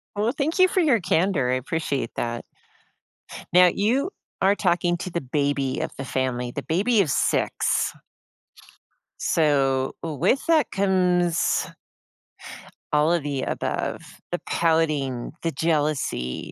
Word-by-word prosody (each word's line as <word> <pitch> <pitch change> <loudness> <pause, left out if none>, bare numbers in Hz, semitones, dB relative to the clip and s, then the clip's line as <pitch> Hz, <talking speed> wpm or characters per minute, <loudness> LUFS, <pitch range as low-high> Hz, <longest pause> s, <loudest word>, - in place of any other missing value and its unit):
Well, 215 +3 +1
thank 305 +6 -2
you 370 - +7
for 370 - 0
your 280 -10 +3
candor, 160 -7 +1
appreciate 135 -1 -2
that. 120 0 -3 1.1
Now 180 0 +7
you 240 - +1 0.3
are 195 +2 +4
talking 175 -3 +1
to 185 - -5
the 170 - -2
baby 140 0 -1
of - - -2
the 135 - -5
family, 125 -2 -2
the 140 - -5
baby 200 +6 +2
of 150 - -2
6. - - +1 1.3
So, 135 -4 +1
w 160 -3 -3
with 270 - +1
that 320 -3 +3
comes 180 -3 +1 1.3
all 150 +3 +3
of 170 -4 +1
the 140 -2 -2
above, - - -3 0.3
the - - -1
pouting, 150 -7 0
the 165 - 0
jealousy. 145 - -1
165 Hz, 125 wpm, -24 LUFS, 135-190 Hz, 1.3 s, you